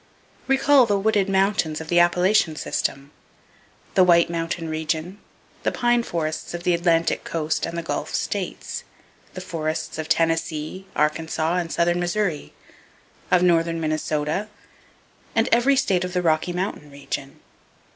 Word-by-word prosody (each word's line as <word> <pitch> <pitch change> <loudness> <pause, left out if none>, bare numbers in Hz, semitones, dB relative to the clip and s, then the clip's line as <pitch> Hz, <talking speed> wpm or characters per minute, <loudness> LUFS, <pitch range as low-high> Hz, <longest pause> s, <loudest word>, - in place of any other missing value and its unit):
Recall 270 -1 +5
the 205 -2 +2
wooded 200 -1 +1
mountains 190 -5 +1
of 160 - -8
the 175 +1 +3
Appalachian 175 -1 +3
system, 140 -2 -3 0.8
the 185 - +5
White 170 -1 +4
Mountain 165 0 -3
region, 160 +4 -3 0.4
the - - 0
pine 240 -1 +2
forests 160 -5 -3
of 175 - -6
the 180 - +2
Atlantic 170 -1 +1
Coast 160 -1 -2
and 170 - -5
the 170 - -3
Gulf 165 - -3
States, - - -3 0.5
the 185 - -5
forests 160 -3 -4
of 160 - -4
Tennessee, 165 +2 -1
Arkansas 160 +2 0
and 170 -2 -2
southern 175 +1 +1
Missouri; 175 -3 -1 0.8
of 180 -1 +4
northern 165 -1 +2
Minnesota, 155 +3 -1 0.9
and 225 +1 +3
every 250 +4 +4
state 195 -10 +1
of 180 0 -4
the 180 -1 0
Rocky 160 +1 +1
Mountain 180 -4 -4
region. 140 -1 -6
170 Hz, 140 wpm, -23 LUFS, 160-185 Hz, 0.9 s, Recall